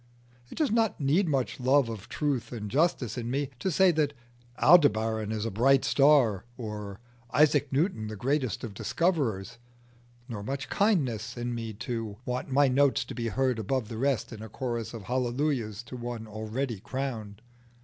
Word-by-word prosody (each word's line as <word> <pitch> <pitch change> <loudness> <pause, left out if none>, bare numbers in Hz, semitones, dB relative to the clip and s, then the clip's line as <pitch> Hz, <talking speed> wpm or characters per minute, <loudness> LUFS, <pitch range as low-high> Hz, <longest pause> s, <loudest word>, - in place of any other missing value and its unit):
It - - -11
does 305 -7 +1
not 225 -1 +1
need 155 +6 +2
much 135 -3 -1
love 130 +1 +4
of 110 -3 -7
truth 145 -5 -1
and 105 -4 -5
justice 135 -5 +1
in 120 0 -4
me 140 +2 -1
to 190 - -1
say 190 +2 +5
that 150 -3 0 0.4
Aldebaran 110 -9 +4
is 110 0 -2
a 115 - -2
bright 130 +6 +4
star, 135 -9 +4
or 105 -4 -6 0.3
Isaac 145 0 +3
Newton 140 - 0
the 110 - -5
greatest 130 -1 -1
of 115 -4 -5
discoverers; 120 - -1 0.7
nor 115 -6 -5
much 135 +7 -4
kindliness 130 - +1
in 120 0 -2
me 115 -2 -4
to 115 -1 -4
want 125 +2 -3
my 140 +1 +5
notes 135 +1 +3
to - - -7
be 115 -2 -3
heard 130 +1 0
above 115 +1 -1
the 115 - -5
rest 125 -3 0
in 110 - -9
a 110 - -8
chorus 120 -2 -4
of 110 - -7
hallelujahs 125 -2 -1
to 125 - -9
one 120 -2 -5
already 110 +2 -4
crowned. 115 -4 -5
125 Hz, 170 wpm, -28 LUFS, 110-140 Hz, 0.7 s, say